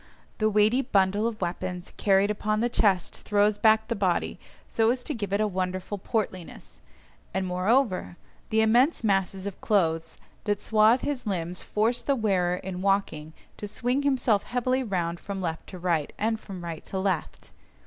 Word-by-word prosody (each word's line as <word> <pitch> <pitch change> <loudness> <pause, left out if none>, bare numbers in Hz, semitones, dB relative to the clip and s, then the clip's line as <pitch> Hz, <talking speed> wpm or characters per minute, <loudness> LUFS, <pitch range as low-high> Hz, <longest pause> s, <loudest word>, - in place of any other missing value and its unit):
The 215 0 +3
weighty 215 +5 +3
bundle 205 -1 +2
of 230 -2 -4
weapons 180 0 -4
carried 200 0 +3
upon 215 0 -1
the 240 +2 +1
chest 200 -7 +1
throws 205 0 +1
back 220 0 +4
the 235 - -1
body 190 -4 0 0.3
so 225 0 +2
as 250 +1 0
to 300 - -3
give 205 -6 -4
it 200 - +1
a 215 - +3
wonderful 185 0 -3
portliness, 190 -5 -4 0.5
and 190 0 0
moreover, 185 +1 +1 0.3
the 220 0 +3
immense 245 +7 +3
masses 195 -2 0
of 200 -2 -6
clothes 165 -5 0 0.3
that 205 -1 0
swathe 220 +3 +4
his 265 -5 -3
limbs 180 -2 -2
force 230 +3 0
the 280 - +1
wearer 190 -6 +1
in 185 0 -6
walking 190 -6 0 0.2
to 210 - -5
swing 245 +6 -1
himself 260 -7 +2
heavily 255 +3 0
round 175 -7 -2
from 200 -1 -5
left 165 -3 -4
to 185 - -9
right, 170 -4 0
and 220 +1 0
from 190 -5 -9
right 165 -2 -6
to 190 - -5
left. 190 -3 -2
200 Hz, 170 wpm, -27 LUFS, 185-220 Hz, 0.5 s, back